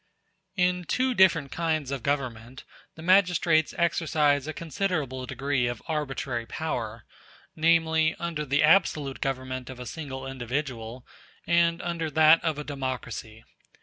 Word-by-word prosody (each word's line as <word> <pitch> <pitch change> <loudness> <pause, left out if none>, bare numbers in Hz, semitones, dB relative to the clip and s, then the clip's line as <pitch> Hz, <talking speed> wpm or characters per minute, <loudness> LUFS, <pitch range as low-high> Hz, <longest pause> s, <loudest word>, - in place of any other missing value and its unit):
In 180 -1 +1
two 255 +8 +1
different 170 - +4
kinds 155 -4 -1
of 140 -3 -3
government 130 -3 -3 0.3
the 160 - -10
magistrates 175 -4 +3
*a - - -11
exercise 150 -4 +2
a - - -2
considerable 155 -7 -3
degree 135 -2 -1
of 120 -2 -3
arbitrary 135 -6 -3
power; 115 -8 -4 0.5
namely, 160 -1 +3
under 170 -3 -3
the 145 0 +1
absolute 150 -4 +3
government 130 -1 -3
of 130 -1 -9
a 125 - -7
single 135 -1 -6
individual, 125 -2 -4 0.4
and 170 0 +2
under 170 -2 -2
that 155 +1 +5
of 160 -3 0
a 150 - -4
democracy. 130 -6 -5
150 Hz, 135 wpm, -27 LUFS, 130-165 Hz, 0.5 s, that